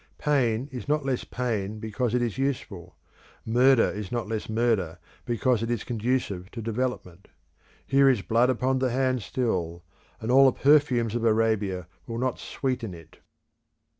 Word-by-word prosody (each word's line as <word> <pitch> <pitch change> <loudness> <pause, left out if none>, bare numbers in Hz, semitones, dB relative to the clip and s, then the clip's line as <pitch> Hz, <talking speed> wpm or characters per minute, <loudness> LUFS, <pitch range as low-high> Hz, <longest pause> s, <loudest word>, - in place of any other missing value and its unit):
Pain 130 -4 +1
is 125 0 -7
not 150 -1 0
less 130 -2 -1
pain 110 -4 -3
because 110 +2 -2
it 125 - +1
is 115 -3 -2
useful; 100 -10 -3 0.5
murder 125 +2 +5
is 105 -2 -6
not 120 -3 -2
less 110 0 -4
murder 110 -7 0 0.3
because 120 0 +1
it 115 - -2
is 120 -2 -1
conducive 115 -6 -2
to 120 - -8
development. 115 -5 -4 0.6
Here 135 0 +4
is 120 -7 +1
blood 120 +3 +3
upon 130 +1 +1
the 130 -1 +1
hand 130 0 0
still, 90 -7 -2 0.4
and 110 +2 -2
all 135 +2 +7
the - - -17
perfumes 135 -6 +3
of 120 -1 -2
Arabia 110 -5 +1 0.2
will 115 -1 -4
not 130 +1 -1
sweeten 125 -8 -3
it. 80 -2 -16
115 Hz, 160 wpm, -26 LUFS, 105-130 Hz, 0.6 s, all